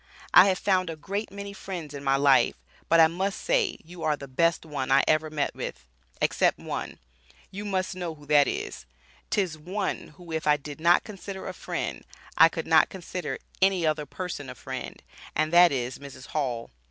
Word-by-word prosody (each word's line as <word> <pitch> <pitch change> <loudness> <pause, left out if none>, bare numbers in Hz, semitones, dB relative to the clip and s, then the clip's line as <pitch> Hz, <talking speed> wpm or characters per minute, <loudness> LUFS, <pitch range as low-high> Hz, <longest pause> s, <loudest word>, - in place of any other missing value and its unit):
I - - +9
have 190 -1 +2
found 185 -3 +1
a 165 - -4
great 200 +8 -4
many 200 0 -7
friends 175 -7 -7
in 140 -1 -7
my 135 0 +3
life, 140 -1 +4 0.3
but 165 - +5
I 165 - +9
must 190 +5 -1
say - - +1
you 175 +1 -11
are 155 -2 +1
the 140 - -9
best 165 +6 +1
one 140 -4 -3
I 135 +1 +6
ever 155 0 +2
met 150 -2 -1
with, 65 - -6 0.3
except - - +2
one, - - -5 0.5
you 200 +2 -6
must 190 -2 -1
know 175 -3 -4
who 150 -1 -16
that 145 -1 +5
is, 60 - -4 0.4
'tis 180 -6 0
one 190 +5 -3
who 175 -2 -11
if 160 -1 -2
I 150 0 +5
did 145 +1 -9
not 170 +1 +5
consider 195 -2 -8
a - - -4
friend, - - -4 0.3
I - - +8
could - - -5
not - - +5
consider 180 -1 -5 0.2
any 190 -3 +3
other 155 -1 0
person 180 -7 -5
a - - -7
friend, - - -7 0.3
and 155 +1 0
that 175 -1 +8
is 125 -2 -3
Mrs. 140 -2 -11
Hall. 125 -6 -2
165 Hz, 195 wpm, -27 LUFS, 145-190 Hz, 0.5 s, I